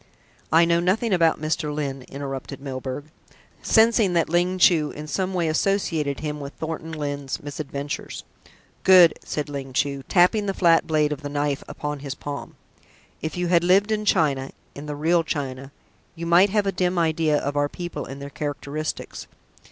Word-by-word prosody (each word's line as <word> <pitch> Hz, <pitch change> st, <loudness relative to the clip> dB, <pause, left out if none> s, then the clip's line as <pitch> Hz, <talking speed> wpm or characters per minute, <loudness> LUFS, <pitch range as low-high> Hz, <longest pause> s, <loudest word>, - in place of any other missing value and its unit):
"I 165 Hz, +1 st, +6 dB
know 170 Hz, 0 st, +3 dB
nothing 195 Hz, +5 st, +1 dB
about 165 Hz, -3 st, +3 dB
Mr. 155 Hz, 0 st, -1 dB
Lyne," 140 Hz, -3 st, -4 dB
interrupted 135 Hz, 0 st, -6 dB
Milburgh, 135 Hz, +2 st, -6 dB, 0.5 s
sensing 220 Hz, -4 st, +4 dB
that 170 Hz, -2 st, +2 dB
Ling 175 Hz, +2 st, +1 dB
Chu 165 Hz, -5 st, +4 dB
in 150 Hz, -, -8 dB
some 185 Hz, +5 st, -2 dB
way 170 Hz, -2 st, +1 dB
associated 160 Hz, -4 st, 0 dB
him 150 Hz, -1 st, -4 dB
with 140 Hz, 0 st, -7 dB
Thornton 160 Hz, 0 st, -5 dB
Lyne's 145 Hz, -3 st, -4 dB
misadventures. 145 Hz, -1 st, -5 dB, 0.6 s
"Good!" 180 Hz, -4 st, +8 dB
said 150 Hz, -1 st, -3 dB
Ling 135 Hz, -2 st, -6 dB
Chu, 140 Hz, +1 st, 0 dB
tapping 200 Hz, +3 st, +4 dB
the 195 Hz, -, -1 dB
flat 170 Hz, -2 st, +4 dB
blade 150 Hz, -2 st, +2 dB
of 150 Hz, -, -3 dB
his 145 Hz, -, -5 dB
knife 145 Hz, -1 st, -1 dB
upon 150 Hz, -1 st, -5 dB
his 140 Hz, -1 st, -5 dB
palm. 145 Hz, -1 st, -7 dB, 0.7 s
"If 160 Hz, +2 st, -4 dB
you 175 Hz, -1 st, -1 dB
had 170 Hz, -1 st, +4 dB
lived 195 Hz, +4 st, +4 dB
in 215 Hz, -1 st, 0 dB
China 145 Hz, -9 st, +1 dB, 0.2 s
in 145 Hz, +1 st, -9 dB
the 150 Hz, -, -4 dB
real 165 Hz, +3 st, +2 dB
China 135 Hz, -3 st, -4 dB, 0.4 s
you 170 Hz, 0 st, -6 dB
might 175 Hz, +4 st, +5 dB
have 205 Hz, 0 st, +1 dB
a 195 Hz, -, +1 dB
dim 180 Hz, -1 st, 0 dB
idea 160 Hz, -2 st, +2 dB
of 145 Hz, 0 st, -3 dB
our 145 Hz, 0 st, +1 dB
people 175 Hz, +1 st, -6 dB
and 135 Hz, +1 st, -8 dB
their 140 Hz, 0 st, -8 dB
characteristics. 150 Hz, +1 st, -5 dB
155 Hz, 175 wpm, -24 LUFS, 145-175 Hz, 0.7 s, Good